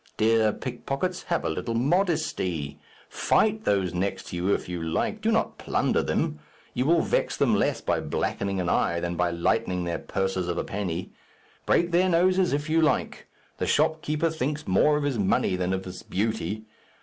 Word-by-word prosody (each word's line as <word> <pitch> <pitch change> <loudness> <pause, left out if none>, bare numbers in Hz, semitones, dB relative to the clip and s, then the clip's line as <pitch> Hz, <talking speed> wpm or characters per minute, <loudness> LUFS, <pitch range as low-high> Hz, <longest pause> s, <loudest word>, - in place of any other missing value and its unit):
Dear 110 0 +3
pickpockets, 135 - -3
have 170 - -1
a - - +1
little 115 - -3
modesty. 115 - 0 0.3
Fight 215 0 +1
those 95 -3 +1
next 95 +3 -2
to - - -6
you 90 +3 0
if - - 0
you 90 -1 -4
like; 80 0 -1
do - - +1
not - - 0
plunder - - +1
them. 75 - -1 0.3
You 125 +3 0
will 165 0 +4
vex - - 0
them - - +3
less - - +1
by - - 0
blackening 100 -1 -2
an 90 - -1
eye, 85 0 +1
than 85 0 -3
by 90 0 +1
lightening 90 +1 0
their 85 -1 -2
purses 95 -2 -2
of 85 -1 -2
a - - 0
penny. 95 -3 -4 0.6
Break 170 0 +3
their 180 +2 +3
noses 185 +1 +3
if 145 +2 -1
you 160 +1 +3
like. 155 - 0 0.3
The - - -1
shopkeeper 155 +1 +1
thinks 150 -1 -3
more 150 +11 +4
of 150 - -2
his 140 -5 -1
money 95 -1 +2
than 90 0 -1
of 95 0 -2
his 90 -1 -7
beauty. 110 0 -2
105 Hz, 185 wpm, -26 LUFS, -, 0.6 s, will